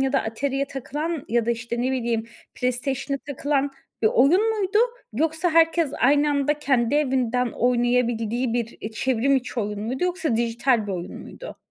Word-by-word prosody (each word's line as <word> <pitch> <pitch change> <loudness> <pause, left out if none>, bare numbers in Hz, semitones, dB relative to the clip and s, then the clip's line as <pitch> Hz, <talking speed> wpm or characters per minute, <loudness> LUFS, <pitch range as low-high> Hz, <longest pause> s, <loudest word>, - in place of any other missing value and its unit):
ya 270 0 +1
da 270 - +2
Atari'ye 270 +5 -1
takılan 295 +4 -4
ya 235 0 +1
da, - - +2
işte, 235 +1 -2
ne 260 +1 0
bileyim, 230 -3 -1 0.3
PlayStation'a 265 +2 -2
takılan 285 0 0 0.3
bir - - +5
oyun 350 - +4
muydu, 395 +1 +1 0.3
yoksa 320 +7 0
herkes 330 -2 +3
aynı 290 +3 +4
anda 290 +1 +1
kendi 265 -3 +1
evinden 250 -4 +1
oynayabildiği 240 -1 +1
bir, 235 -1 -2
iii, 220 - -6
çevrim 260 +3 +1
içi 250 -2 -3
oyun 210 0 -3
muydu, 255 +9 -2
yoksa 350 -9 0
dijital 235 0 +1
bir 200 - -3
oyun 175 -1 -5
muydu? - - -10
260 Hz, 165 wpm, -24 LUFS, 235-290 Hz, 0.3 s, bir